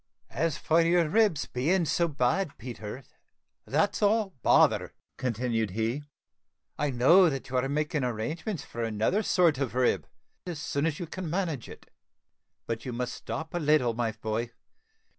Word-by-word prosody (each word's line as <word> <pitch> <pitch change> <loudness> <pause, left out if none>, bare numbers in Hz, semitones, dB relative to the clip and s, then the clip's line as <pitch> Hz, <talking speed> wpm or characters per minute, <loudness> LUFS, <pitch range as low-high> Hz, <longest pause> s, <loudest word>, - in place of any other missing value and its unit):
"As 150 +3 -1
for 165 +1 +3
your 170 0 +3
ribs 205 -6 +3
being 165 +8 +1
so 170 +2 +1
bad, 145 +4 0
Peter, 120 +1 -7 0.6
that's 160 +10 +1
all 210 -1 +2
bother," - - +3 0.2
continued 115 -3 -1
he; 115 +8 -1 0.7
"I 150 - -1
know 165 +9 +6
that 135 -1 -5
you 130 - -1
are 130 +2 0
making 150 0 -1
arrangements 140 - -3
for 115 - -6
another 115 - +1
sort 175 -8 +3
of 130 -4 -2
rib, 125 -1 +1 0.4
as 170 -4 -4
soon 145 -1 -1
as 155 -2 -3
you 175 - -3
can 175 +1 -6
manage 165 - -2
it; - - -13 0.7
but 115 0 -4
you 125 - -4
must 125 +1 -3
stop 160 0 -6
a 175 - -1
little, 150 -6 +3
my 115 -1 -1
boy. 110 +1 -3
145 Hz, 160 wpm, -28 LUFS, 120-170 Hz, 0.7 s, know